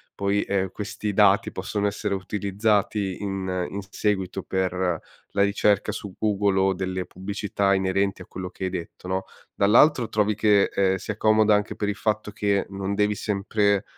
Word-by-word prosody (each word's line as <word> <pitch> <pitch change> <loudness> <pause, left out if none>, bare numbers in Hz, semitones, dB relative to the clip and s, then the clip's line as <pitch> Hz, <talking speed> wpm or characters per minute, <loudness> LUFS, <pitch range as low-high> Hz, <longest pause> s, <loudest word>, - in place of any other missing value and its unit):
poi, 100 +1 +1
ehm, 95 -2 -1
questi 105 0 -4
dati - - +4
possono 105 0 -2
essere 100 0 -2
utilizzati 100 0 0
in 95 -2 -2
in 100 - -5
s 95 - -17
seguito 95 -3 -1
per 95 -1 -1
la 90 +2 -2
ricerca 100 +1 +2
su 100 -2 -7
Google 100 -2 +1
o 95 0 +3
delle 95 0 -3
pubblicità 100 +1 -1
inerenti 95 0 0
a - - -9
quello 90 0 -6
che 95 - -9
hai 95 - 0
detto, 90 0 -7
no? 95 0 -1 0.3
Dall'altro 120 +5 +4
trovi 105 0 +1
che, 105 -2 +4
ehm, 95 -1 +2
sia 105 +2 -5
comoda 110 -1 +4
anche 105 0 0
per 105 - -2
il 105 - -2
fatto 105 0 -1
che 100 -1 0
non 100 0 -3
devi 105 +1 +2
sempre 100 0 0
100 Hz, 170 wpm, -25 LUFS, 95-105 Hz, 0.3 s, dati